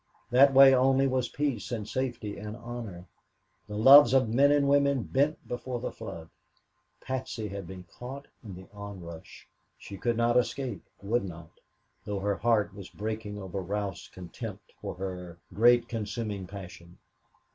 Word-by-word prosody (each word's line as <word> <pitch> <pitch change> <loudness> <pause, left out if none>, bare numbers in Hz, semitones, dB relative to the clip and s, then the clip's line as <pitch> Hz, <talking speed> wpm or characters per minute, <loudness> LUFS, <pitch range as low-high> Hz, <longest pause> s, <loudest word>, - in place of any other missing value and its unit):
That 135 +3 +7
way 135 0 +8
only 135 +1 +4
was 130 -2 0
peace 140 -9 -2
and 110 -3 -3
safety 120 -5 -3
and 105 +1 -7
honor. 115 -7 -8 0.6
The 105 0 -5
loves 135 +2 +8
of 130 -4 +3
men 140 +4 +5
and 145 -1 +3
women 140 -2 +3
bent 140 - 0
before 120 0 -4
the - - -4
flood. 80 -1 -8 0.7
Patsy 130 -5 -4
had 100 -2 -6
been 95 0 -9
caught 130 +10 -9 0.2
in 100 -5 -8
the 95 +1 -11
onrush. 95 -5 -10 0.3
She 100 - -10
could 120 +4 -1
not 120 +1 +3
escape 125 -2 -1 0.2
would 110 +3 0
not, 85 -2 -9 0.5
though 100 -1 -3
her 100 0 -1
heart 110 -5 +1
was 100 -2 -10
breaking 105 -1 -5
over 95 0 -5
Ralph's 100 -1 -4
contempt 90 -2 -9
for - - -5
her 90 -2 -6 0.2
great, 120 +2 +5
consuming 105 -4 -4
passion. 90 -3 -11
110 Hz, 155 wpm, -29 LUFS, 95-130 Hz, 0.7 s, way